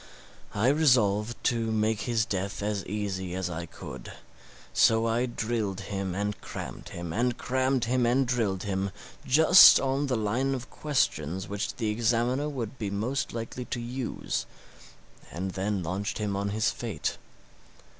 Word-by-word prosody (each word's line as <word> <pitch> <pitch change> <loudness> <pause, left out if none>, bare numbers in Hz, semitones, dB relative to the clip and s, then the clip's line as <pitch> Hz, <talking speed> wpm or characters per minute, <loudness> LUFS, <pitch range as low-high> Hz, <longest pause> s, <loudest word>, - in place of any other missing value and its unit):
I 110 +5 +3
resolved 120 -7 +3
to 115 -3 +1
make 110 0 +1
his 115 -2 +2
death 100 -2 -3
as 105 -2 -1
easy 95 -3 -3
as 95 -1 -2
I 85 0 -5
could; 65 -5 -9 0.6
so 115 0 +4
I 115 +2 +1
drilled 110 -5 -2
him 95 -2 -3
and 105 +1 -2
crammed - - -7
him, 85 -1 -6
and 120 +3 0
crammed 130 -1 0
him 125 0 +2
and 130 +3 +3
drilled 110 -7 0
him, 100 -1 -1 0.4
just 160 +7 +9
on 135 +1 0
the 125 -3 0
line 120 +6 0
of 130 -1 -8
questions 95 - -1
which 100 0 -3
the 110 -3 -1
examiner 120 +6 +1
would 130 -4 -5
be 105 -3 -2
most 115 +7 -2
likely 115 +2 -5
to 120 - -4
use, 120 +1 -3 0.8
and 95 +4 -3
then 95 0 -2
launched 95 +5 -3
him 105 -2 -2
on 100 +1 -1
his 110 +2 +1
fate. 110 -11 -4
110 Hz, 155 wpm, -28 LUFS, 100-125 Hz, 0.8 s, just